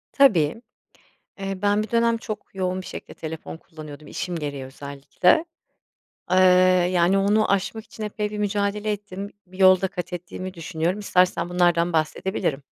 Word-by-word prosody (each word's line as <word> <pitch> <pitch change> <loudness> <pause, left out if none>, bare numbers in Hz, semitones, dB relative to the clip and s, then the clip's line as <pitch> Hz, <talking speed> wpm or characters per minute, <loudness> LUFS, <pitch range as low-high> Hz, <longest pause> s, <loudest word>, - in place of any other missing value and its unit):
Tabii, 215 - +4 0.8
eee, 195 -1 -4
ben 205 +1 +2
bir 215 - -9
dönem 230 0 +3
çok 215 -2 -7
yoğun 185 0 -1
bir - - -12
şekilde - - -8
telefon 160 0 -7
kullanıyordum, 155 -3 -11
işim 180 +3 -4
gereği 145 -4 -4
özellikle. 140 - 0 0.9
Eee, 185 - +4 0.6
yani, 180 +2 +3
onu 205 +2 +3
aşmak 205 +3 -1
için 220 - -9
epey 210 0 -3
bir 210 - -5
mücadele 205 +1 -1
ettim, 200 -1 -6 0.2
bir 185 +1 -15
yol 185 -1 +7
da 190 - +1
kat 180 -1 -6
ettiğimi 180 +1 -6
düşünüyorum. 170 +2 -2
İstersen 185 -3 +2
bunlardan 175 -1 +2
bahsedebilirim. 155 -2 -1
185 Hz, 150 wpm, -24 LUFS, 165-205 Hz, 0.9 s, yol